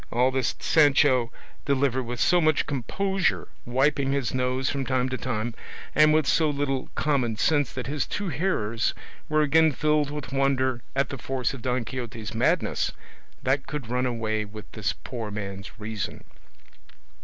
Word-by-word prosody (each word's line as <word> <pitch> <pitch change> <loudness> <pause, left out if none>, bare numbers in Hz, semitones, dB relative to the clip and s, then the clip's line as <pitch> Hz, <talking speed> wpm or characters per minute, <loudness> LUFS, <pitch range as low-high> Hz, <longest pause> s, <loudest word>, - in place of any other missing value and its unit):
All 125 +2 +2
this 130 -2 0
Sancho 135 -5 +4 0.3
delivered 135 -2 +2
with 120 -1 -5
so 180 -1 +4
much 155 -2 +3
composure 190 - -1 0.2
wiping 135 +2 +2
his 140 -4 -1
nose 130 +1 0
from 140 -1 -1
time 130 -1 0
to 130 - -2
time 120 -2 -2 0.4
and 155 0 +6
with 155 -1 +3
so 155 +2 +3
little 140 -2 -1
common 130 -7 +1
sense 145 +2 +2
that 125 - -4
his 145 0 -2
two 205 -3 -3
hearers 115 - 0 0.3
were 155 0 +3
again 160 +2 +5
filled 150 0 +1
with 145 -2 -6
wonder 130 -2 +1
at 135 -1 +1
the 135 - -6
force 130 +2 -2
of 135 - -8
Don 125 0 -1
Quixote's 115 -4 -5
madness - - +1 0.5
that 135 +1 +1
could 140 -7 -5
run 125 +1 +1
away 110 -3 -1
with 105 +1 -10
this 100 -5 -1
poor 115 +3 -6
man's 100 0 -6
reason. 105 -2 -5
130 Hz, 160 wpm, -26 LUFS, 120-145 Hz, 0.5 s, and